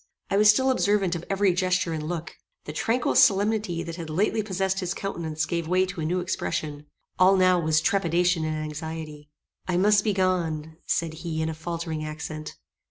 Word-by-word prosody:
I 195 - +3
was 210 0 +6
still 260 +5 +4
observant 205 -7 +1
of 170 -1 -4
every 195 -1 +2
gesture 185 -1 0
and 155 - -3
look. 160 +1 -5 0.3
The 150 - -6
tranquil 230 +10 0
solemnity 210 -6 +3
that 170 0 -7
had 165 -2 -6
lately 205 +7 +1
possessed 190 -2 -1
his 180 -1 -2
countenance 160 -5 -3
gave 170 -1 -2
way 185 +2 +3
to 185 -3 -6
a - - -2
new 180 +3 0
expression. 150 -4 -3 0.3
All 190 +1 +6
now 185 -1 +4
was 160 -1 +2
trepidation 175 -1 +1
and 155 0 -1
anxiety. 155 -1 -7 0.4
"I 180 -1 0
must 205 +2 +4
be 210 - +1
gone," 165 -5 -1
said 165 -1 0
he 160 -2 -3
in 160 - -1
a - - -3
faltering 165 -1 -4
accent. 155 0 -6
175 Hz, 185 wpm, -26 LUFS, 160-190 Hz, 0.4 s, was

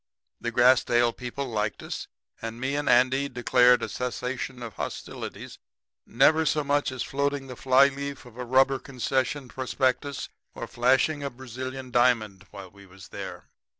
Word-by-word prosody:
The 120 - -3
Grassdale 120 -1 +4
people 125 +2 -5
liked 105 -3 -2
us, - - -5 0.3
and 115 +1 -6
me 130 +2 -1
and 145 0 -1
Andy 130 +3 +3
declared 125 0 +4
a - - -1
cessation 125 0 -4
of 115 -3 -7
hostilities, - - -7 0.5
never 155 +6 +4
so 150 -1 +1
much 145 -1 +1
as 130 - -3
floating 140 0 -1
the 130 -1 -8
fly 130 +2 +5
leaf 140 0 -6
of 120 -2 -14
a 125 - -5
rubber 130 +2 +3
concession 130 +1 -2
prospectus 130 +2 -1 0.3
or - - -5
flashing 130 +5 +2
a 140 - -2
Brazilian 130 +1 -7
diamond 110 -6 +2
while 95 -2 -10
we 100 0 -16
was 95 +1 -14
there. - - -7
130 Hz, 155 wpm, -26 LUFS, 120-135 Hz, 0.5 s, fly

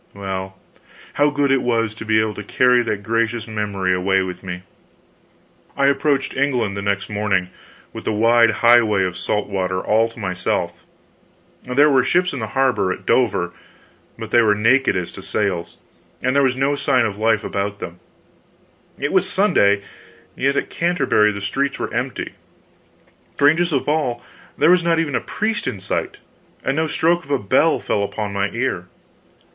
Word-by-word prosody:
Well, 95 -1 -5 0.6
how 145 +1 +3
good 145 -1 0
it 135 -1 +3
was 115 -3 0
to 110 - -9
be 110 0 +3
able 110 -1 0
to 105 - -7
carry 125 +4 +3
that 105 -3 -3
gracious 115 +1 -1
memory 105 -4 -1
away 95 +1 +1
with 90 -1 -6
me! 90 -1 -7 1.1
I 140 - +2
approached 140 0 +1
England 125 -7 0
the 100 - -4
next 100 0 -1
morning, 100 -3 -1 0.4
with - - -8
the - - 0
wide 115 +2 +4 0.2
highway 115 -5 +5
of 90 -2 -2
salt 105 +2 -2
water 95 -2 -2
all 110 +4 +2
to 115 - -17
myself. 95 -4 -3 0.8
There 145 +4 +3
were 130 -2 +4
ships 180 +3 +1
in 140 - -4
the 110 - -3
harbor, 130 -8 +2
at - - -6
Dover, 100 -8 +1 0.7
but - - -8
they 120 - +5
were 105 -2 +3
naked 125 +6 +3
as 90 -2 -3
to - - -10
sails, 95 -5 -2 0.5
and 130 +1 +1
there 140 - +5
was 130 -2 +2
no 135 +2 +1
sign 130 -4 +2
of 105 -1 -4
life 110 -1 +2
about 100 +1 -3
them. 90 -3 -8 1.0
It - - -2
was - - +2
Sunday; 100 0 +3 0.5
yet 140 +1 0
at - - -2
Canterbury 140 -11 +2
the 100 -1 -6
streets 135 +9 -1
were - - -4
empty; - - -3 1.0
strangest 165 +4 +3
of 140 -4 -1
all, 145 -6 -1 0.3
there 170 - +4
was 180 0 +5
not 170 -1 +1
even 160 -3 -1
a - - 0
priest 220 0 -2
in 100 - -3
sight, 95 - -3 0.5
and 135 - 0
no 160 +1 0
stroke 170 +3 +1
of 140 - -17
a 140 - +2
bell 100 -6 +2
fell 100 - -1
upon 100 0 -4
my 100 0 0
ear. 115 -7 -3
115 Hz, 175 wpm, -20 LUFS, 100-135 Hz, 1.1 s, highway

